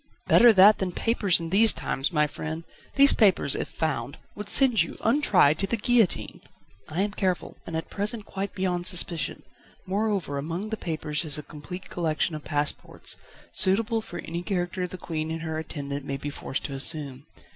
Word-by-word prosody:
"Better 240 0 +7
that 205 +1 +6
than 190 -2 -2
papers 210 -5 +2
in 165 0 -6
these 215 +3 +6
times, 135 +6 -3
my 150 -3 +2
friend: 160 +2 -6 0.3
these 280 +1 +7
papers, 190 - +3
if - - -3
found, 140 -5 -3 0.2
would 205 0 -6
send 245 - +6
you, 165 - -4
untried, 210 - +3
to 195 - 0
the 235 - 0
guillotine." 225 -3 +2 0.5
"I 160 +4 -2
am 205 - -2
careful, 185 -3 -2
and, 160 - -3
at 160 - -6
present, 210 +1 -1
quite 195 0 -5
beyond 180 -2 0
suspicion. 170 -5 -1 0.4
Moreover, 195 -7 -2
among 170 +8 -5
the 220 - -2
papers 155 -5 -3
is 150 -3 +2
a 150 - -6
complete 180 +6 -10
collection 165 -1 -1
of 155 -1 -6
passports, 145 0 -1 0.4
suitable 225 +4 +2
for 175 -5 -9
any 170 0 -5
character 180 -1 -3
the 185 - -8
Queen 160 -2 -4
and 165 0 -5
her 160 -1 -3
attendant 145 -3 -6
may 140 0 -4
be 145 +2 -6
forced 135 - -5
to 140 - -5
assume. 140 0 +1
175 Hz, 180 wpm, -26 LUFS, 155-200 Hz, 0.5 s, Better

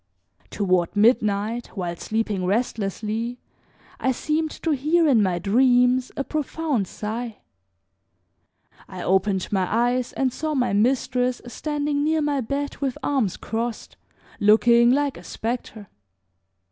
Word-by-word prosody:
Toward 185 -3 0
midnight, 215 +1 +2
while 175 -2 -3
sleeping 215 0 -2
restlessly, 220 +3 -2 0.6
I 260 - +1
seemed 310 +4 -1
to 325 - +1
hear 310 +4 +2
in 250 -7 +4
my 185 -3 +1
dreams 250 +5 +3
a 275 - 0
profound 300 - -2
sigh. 220 +3 -5 1.5
I - - -7
opened 190 0 +1
my 190 -3 +1
eyes 245 +2 +1
and 260 -2 0
saw 310 +2 -2
my 250 -6 +1
mistress 250 +3 +1
standing 290 +3 -2
near 315 0 +1
my 290 -2 0
bed 280 +4 -3
with 270 -3 -2
arms 255 -10 0
crossed, 230 0 -4 0.4
looking 235 +3 +5
like 280 +1 +1
a - - -12
specter. 225 -2 -5
240 Hz, 120 wpm, -23 LUFS, 210-275 Hz, 1.5 s, looking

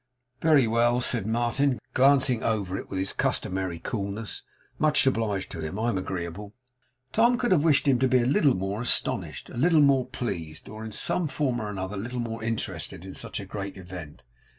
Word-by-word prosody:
'Very 155 -5 +5
well,' 120 +2 +2
said 120 -4 0
Martin, 120 +4 +1 0.2
glancing 130 -3 +4
over 100 -5 -1
it - - -6
with 95 - -4
his 95 +1 0
customary 95 -2 -1
coolness; 100 +2 -4 0.4
'much 150 -2 +4
obliged 110 -7 0
to 85 - -6
him. 80 +5 -4
I'm 115 +1 0
agreeable.' 95 +2 -5 0.6
Tom 235 +2 +4
could 240 -3 0
have 160 -6 +4
wished 150 -3 +3
him 130 -3 +4
to 130 - +3
be 130 0 +4
a - - 0
little 135 +1 +3
more 95 +3 -2
astonished, 125 - -1
a - - -8
little 160 +4 +4
more 140 -3 +4
pleased, 80 -10 -5
or 110 +1 -8
in 110 - -6
some 170 +9 0
form 135 -4 -1
or 105 - -4
other 95 +2 -4
a - - -4
little 120 +4 -4
more 115 -1 -4
interested 95 -5 -3
in 95 - -8
such - - -4
a - - -6
great 100 -1 -6
event. 90 -5 -9
115 Hz, 195 wpm, -27 LUFS, 95-130 Hz, 0.6 s, Very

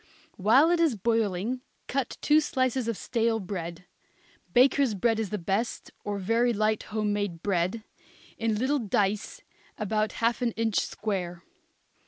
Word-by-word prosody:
While 245 - +5
it 350 - +2
is 320 -7 +3
boiling 225 +2 0 0.3
cut 270 -2 -2
two 300 +1 +5
slices 260 -4 0
of 230 -4 -1
stale 230 -2 0
bread 180 -3 -6 0.7
bakers' 255 0 +4
bread 225 +3 +1
is 220 -3 -2
the 210 - -2
best, 195 +6 -2
or 205 -1 -2
very 230 +5 +2
light 215 0 +1
home 210 -1 0
made 205 -5 -3
bread 195 +3 0 0.5
in 225 -1 0
little 265 +6 +1
dice 210 - -1 0.3
about 215 0 0
half 235 +2 0
an 235 -2 0
inch 225 -1 +1
square. 180 -5 -3
220 Hz, 145 wpm, -28 LUFS, 200-240 Hz, 0.7 s, While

